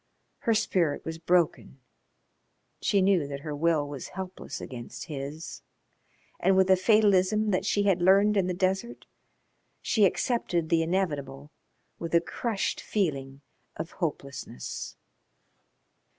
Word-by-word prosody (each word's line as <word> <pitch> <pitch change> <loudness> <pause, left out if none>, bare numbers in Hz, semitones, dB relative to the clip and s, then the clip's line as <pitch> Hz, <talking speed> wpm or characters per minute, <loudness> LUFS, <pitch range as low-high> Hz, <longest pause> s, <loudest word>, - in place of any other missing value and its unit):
Her 230 - +1
spirit 170 -7 0
was 160 0 -5
broken. 170 -5 +1 1.0
She 200 -2 +2
knew 185 -6 +3
that 140 -1 -6
her 150 -1 -5
will 155 -1 +1
was 140 -2 -6
helpless 190 0 -7
against 120 -2 -8
his, 150 +1 -6 0.8
and 190 +1 +3
with 190 0 +4
a - - +8
fatalism 210 +1 +3
that 190 +1 0
she 205 - +2
had 190 -3 +2
learned 200 +3 +5
in 190 -3 +2
the 180 - -1
desert 190 +6 -1 0.7
she 215 -3 +3
accepted 180 -6 0
the 165 0 +3
inevitable 150 -5 -2 0.5
with 170 0 -2
a - - +7
crushed 210 +4 -2
feeling 140 -9 -2 0.3
of 160 +2 -5
hopelessness. 140 - -5
175 Hz, 125 wpm, -28 LUFS, 150-195 Hz, 1.0 s, a